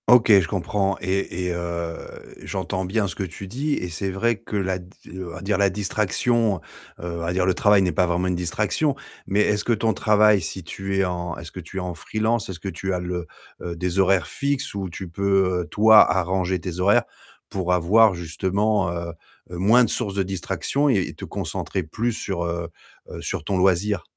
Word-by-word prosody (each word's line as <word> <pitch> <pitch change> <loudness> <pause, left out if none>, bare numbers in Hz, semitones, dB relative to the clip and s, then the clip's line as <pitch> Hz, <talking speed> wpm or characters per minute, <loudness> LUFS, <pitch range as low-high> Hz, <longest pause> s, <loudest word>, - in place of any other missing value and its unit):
OK, 120 -2 +6
je 85 - -3
comprends 95 +1 -1
et 95 -1 -2
et 90 - -1
heu, 85 -1 -3 0.5
j'entends 95 0 -3
bien 100 +2 0
ce 90 - -5
que 100 - -3
tu 95 +2 -7
dis 140 +9 -2
et 90 - -3
c'est 90 +4 -3
vrai 115 +5 +1
que 105 - -5
la 95 -1 -1
d 90 - -13 0.3
on 95 -2 -6
va - - -8
dire 100 0 0
la 100 -1 +4
distraction, 105 +3 +1 0.4
heu, - - -7
on - - -4
va 85 +1 -2
dire 90 0 +1
le 95 - +3
travail 105 +1 +4
n'est 90 - +1
pas 90 0 +2
vraiment 90 +2 0
une 90 - 0
distraction, 105 - 0 0.3
mais 100 +2 +2
est-ce 105 0 +1
que - - 0
ton 110 0 +1
travail, 105 -2 +4
si 90 +3 -5
tu 95 +3 -4
es 95 - +3
en 90 -1 -3
est-ce 85 -1 -9
que - - -8
tu 90 +2 -9
es - - +1
en 90 -1 -4
freelance? 110 +6 -1
Est-ce 90 -3 -6
que 100 - -7
tu 95 0 -3
as 90 - -1
le, 90 -1 -4 0.3
heu, 85 -1 -5
des 90 +2 -2
horaires 95 -3 +4
fixes 140 - -2
ou 95 -2 -4
tu 95 +2 -7
peux, 95 -1 +1
toi, 110 -2 +7
arranger 95 0 0
tes 90 +1 -5
horaires 100 +3 +4 0.5
pour 90 -2 -2
avoir 100 +4 +5
justement, 95 +4 0
heu, 85 -1 -4 0.4
heu, 90 - -6
moins 110 +7 +5
de 115 - +1
source 100 -5 -2
de 100 - +1
distraction 95 - -1
et 130 - +4
et 95 - -2
te - - -8
concentrer 95 - -3
plus 115 +9 -2
sur, 95 -5 -3
heu, 85 0 -3 0.4
heu, - - -7
sur - - -3
ton 95 - -1
loisir? 95 0 +2
95 Hz, 215 wpm, -23 LUFS, 90-105 Hz, 0.5 s, toi